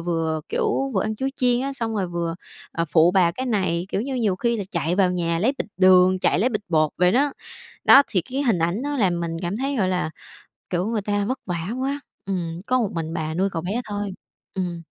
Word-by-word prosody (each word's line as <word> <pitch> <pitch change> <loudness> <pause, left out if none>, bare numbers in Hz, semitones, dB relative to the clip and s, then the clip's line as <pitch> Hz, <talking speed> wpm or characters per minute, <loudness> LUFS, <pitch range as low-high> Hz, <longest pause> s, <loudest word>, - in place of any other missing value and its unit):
vừa, 160 -2 0
kiểu, 270 0 0
vừa 190 - +2
ăn 215 0 -2
chuối 265 +3 -1
chiên 245 -1 +2
á, 275 +1 -2
xong 230 -4 -3
rồi 195 -4 0
vừa, 170 -1 -2 0.4
à, 165 - 0
phụ 160 +2 +4
bà 180 -3 +4
cái 260 +7 -4
này, 185 -6 0
kiểu 195 - -1
như, 265 +3 -3
nhiều 215 -7 +1
khi 235 +4 0
là 200 - -3
chạy 170 0 0
vào 190 -2 +4
nhà 170 -2 0
lấy 235 +9 +2
bịch - - -3
đường, 185 0 +6
chạy 180 - +2
lấy 235 +6 +3
bịch 215 -4 -3
bột 155 -3 +2
vậy 180 +1 +3
đó. 280 +2 +2 0.5
Đó, 280 - +8
thì 185 - +1
cái 265 - -3
hình 225 -10 +2
ảnh 170 +8 0
nó 290 0 -2
làm 185 -7 +2
mình 170 -1 -2
cảm 175 +4 -2
thấy, 275 +3 -1
gọi 190 -3 +2
là, 180 -3 0 0.6
kiểu, 180 +1 0
người 220 -2 -1
ta 205 0 0
vất 255 +4 -2
vả 175 +1 -3
quá, 280 +2 -1 0.2
ừm, 175 -3 -3
có 255 - +2
một 215 - +1
mình 165 -1 -4
bà 160 -1 -3
nuôi 190 +3 +1
cậu 165 -2 -3
bé 205 +7 -2
thôi, 205 -1 -4 0.4
ừm. 175 -3 -3
190 Hz, 240 wpm, -23 LUFS, 170-230 Hz, 0.6 s, Đó